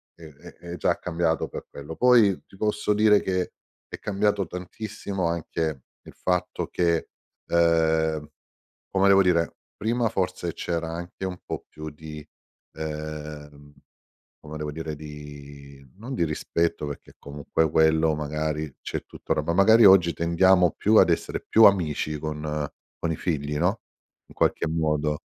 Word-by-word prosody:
è 85 Hz, -, -16 dB
è 75 Hz, -3 st, -13 dB, 0.2 s
è -, -, -4 dB
già -, -, +1 dB
cambiato 85 Hz, -2 st, -1 dB
per -, -, -8 dB
quello. 75 Hz, +3 st, -8 dB
Poi 120 Hz, -6 st, +4 dB
ti -, -, -18 dB
posso 105 Hz, 0 st, 0 dB
dire 105 Hz, 0 st, +5 dB
che 90 Hz, -1 st, -2 dB, 0.3 s
è -, -, -7 dB
cambiato 100 Hz, -1 st, 0 dB
tantissimo 95 Hz, 0 st, -4 dB
anche 80 Hz, -4 st, -2 dB, 0.2 s
il -, -, -13 dB
fatto 90 Hz, 0 st, -1 dB
che 85 Hz, -2 st, 0 dB, 0.4 s
ehm, 80 Hz, -2 st, +2 dB, 0.6 s
come 100 Hz, 0 st, +3 dB
devo 95 Hz, 0 st, +7 dB
dire, 85 Hz, -2 st, +1 dB, 0.2 s
prima 115 Hz, +1 st, 0 dB
forse 90 Hz, -4 st, -2 dB
c'era 85 Hz, -1 st, -3 dB
anche 85 Hz, +3 st, -6 dB
un 90 Hz, -1 st, -4 dB
po' -, -, -5 dB
più 75 Hz, 0 st, -8 dB
di 75 Hz, 0 st, -10 dB, 0.5 s
ehm, 75 Hz, -2 st, -7 dB, 0.7 s
come 75 Hz, +1 st, -7 dB
devo 75 Hz, -1 st, -4 dB
dire, 80 Hz, 0 st, -5 dB
di 70 Hz, -2 st, -11 dB
non 115 Hz, +7 st, -8 dB
di 105 Hz, -, -1 dB
rispetto, 80 Hz, 0 st, -1 dB
perché 70 Hz, -, -8 dB
comunque 75 Hz, +2 st, -1 dB
quello 80 Hz, 0 st, +3 dB
magari 75 Hz, 0 st, -3 dB
c'è -, -, -5 dB
tutt'ora, -, -, -2 dB
ma 85 Hz, -, -1 dB
magari 110 Hz, +4 st, +7 dB
oggi 90 Hz, -3 st, +7 dB
tendiamo 90 Hz, +2 st, +3 dB
più 110 Hz, +2 st, +3 dB
ad 95 Hz, -4 st, +7 dB
essere 85 Hz, -, -1 dB
più 110 Hz, -, +6 dB
amici 75 Hz, -6 st, +3 dB
con 75 Hz, -1 st, -3 dB, 0.3 s
con 85 Hz, -, -2 dB
i 80 Hz, -, -1 dB
figli, 75 Hz, -3 st, -2 dB
no, 90 Hz, +8 st, +1 dB, 0.5 s
in -, -, -17 dB
qualche -, -, +1 dB
modo. 75 Hz, -2 st, 0 dB
80 Hz, 145 wpm, -25 LUFS, 75-95 Hz, 0.7 s, devo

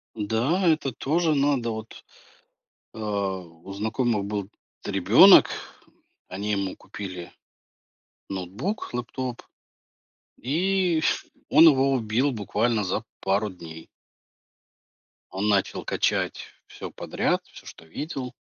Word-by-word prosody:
Да, 120 Hz, -, 0 dB
это 155 Hz, -4 st, +2 dB
тоже 155 Hz, +6 st, 0 dB
надо, 140 Hz, -4 st, +1 dB
вот, 110 Hz, 0 st, -8 dB, 0.9 s
э, -, -, -10 dB
у 95 Hz, -4 st, -4 dB
знакомых 110 Hz, +1 st, -1 dB
был 100 Hz, -1 st, -3 dB, 0.3 s
т -, -, -5 dB
ребенок, 100 Hz, -, +8 dB, 0.8 s
они 100 Hz, +3 st, -3 dB
ему 100 Hz, -2 st, -2 dB
купили 90 Hz, -4 st, -8 dB, 1.0 s
ноутбук, 100 Hz, -, -4 dB
лэптоп, 125 Hz, 0 st, -4 dB, 1.0 s
и 175 Hz, -, +1 dB, 0.5 s
он 165 Hz, -, +7 dB
его 135 Hz, -2 st, +4 dB
убил 125 Hz, +3 st, +1 dB
буквально 110 Hz, 0 st, 0 dB
за 90 Hz, -, -2 dB, 0.2 s
пару 100 Hz, +2 st, +1 dB
дней. 80 Hz, -3 st, -11 dB, 1.4 s
Он 95 Hz, +3 st, -2 dB
начал 100 Hz, -2 st, +1 dB
качать -, -, -1 dB, 0.2 s
всё -, -, -8 dB
подряд -, -, -1 dB
всё, -, -, -15 dB
что -, -, -12 dB
видел. 130 Hz, -, -5 dB
110 Hz, 105 wpm, -25 LUFS, 100-135 Hz, 1.4 s, ребенок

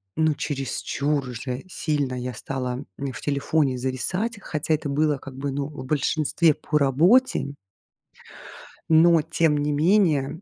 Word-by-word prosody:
ну, 160 Hz, -1 st, +2 dB
чересчур 140 Hz, 0 st, -2 dB
уже 125 Hz, +1 st, -5 dB
сильно 145 Hz, -7 st, -2 dB
я 125 Hz, 0 st, -4 dB
стала, 125 Hz, +2 st, -4 dB
м, 140 Hz, -1 st, -4 dB
в -, -, -8 dB
телефоне 140 Hz, -1 st, 0 dB
зависать. 180 Hz, -, -2 dB
Хотя 155 Hz, -2 st, -2 dB
это 150 Hz, -1 st, -1 dB
было, 150 Hz, 0 st, +1 dB
как 135 Hz, -1 st, -11 dB
бы, 140 Hz, +1 st, -3 dB
ну, 140 Hz, +1 st, -2 dB
в 145 Hz, -3 st, -9 dB
большинстве 155 Hz, +2 st, +2 dB
по 150 Hz, -, -1 dB
работе. 165 Hz, -, +4 dB
Н 140 Hz, -, -6 dB, 1.3 s
Но 165 Hz, +1 st, +6 dB
тем 150 Hz, 0 st, +1 dB
не 145 Hz, 0 st, 0 dB
менее 160 Hz, -2 st, +2 dB
145 Hz, 145 wpm, -24 LUFS, 135-160 Hz, 1.3 s, Но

